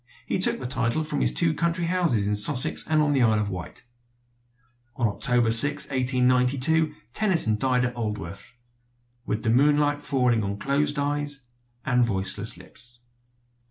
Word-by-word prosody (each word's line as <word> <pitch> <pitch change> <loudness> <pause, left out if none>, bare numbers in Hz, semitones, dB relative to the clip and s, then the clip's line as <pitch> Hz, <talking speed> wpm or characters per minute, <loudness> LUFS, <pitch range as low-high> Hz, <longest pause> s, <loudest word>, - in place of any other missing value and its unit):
He - - -2
took - - +2
the 130 - -7
title 125 +3 -2
from 155 - -4
his - - +1
two 60 +7 +1
country 170 0 -2
houses 165 - 0
in 105 - 0
Sussex 125 +5 +3
and 155 -1 +1
on 145 -1 0
the 135 - +1
Isle 110 -3 +2
of 105 -1 -3
Wight. 90 -2 -8 1.1
On 120 -2 0
October 115 +2 0
6, 145 +6 +5
1892, 130 +4 +1 0.2
Tennyson 170 - +3
died 125 +1 0
at 125 - -4
Aldworth 105 -3 -6 0.7
"with 105 - -3
the 110 - +1
moonlight 145 +3 +2
falling 125 -6 0
on 100 0 -4
closed 145 +5 -1
eyes 145 0 -3 0.4
and 125 -2 +1
voiceless 100 -2 -1
lips." 120 +6 -13
125 Hz, 155 wpm, -24 LUFS, 110-145 Hz, 1.1 s, 6